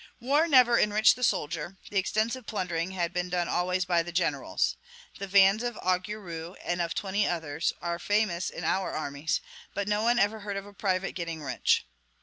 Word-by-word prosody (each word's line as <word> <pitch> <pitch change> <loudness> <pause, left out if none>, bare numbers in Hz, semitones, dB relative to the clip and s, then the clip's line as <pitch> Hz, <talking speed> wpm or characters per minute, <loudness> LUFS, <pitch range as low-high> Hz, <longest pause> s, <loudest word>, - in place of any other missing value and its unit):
War 285 +7 +2
never 250 -5 +6
enriched 210 +1 +5
the 250 - -6
soldier; 165 -3 -1
the 200 - +2
extensive 220 +5 -1
plundering 180 -4 -2
has 175 -2 -1
been 180 0 -2
done 175 -1 0
always 180 +1 0
by 175 -2 +2
the 175 +1 -6
generals. 175 +2 0 0.4
The 200 - -4
vans 195 +2 +5
of 240 -2 -3
Augereau, 180 -2 -3
and 175 0 0
of 170 -1 -2
twenty 200 +1 0
others, 160 -2 -1
are 170 0 -2
famous 205 -3 0
in - - -7
our 190 0 0
armies; 145 +1 -2 0.3
but 200 0 -2
no 210 0 +1
one 235 +2 +3
ever 220 -1 +2
heard 200 -1 -4
of 195 - -5
a 205 - -13
private 190 -1 -1
getting 170 -3 -5
rich. 135 -3 +1
190 Hz, 185 wpm, -28 LUFS, 170-210 Hz, 0.4 s, never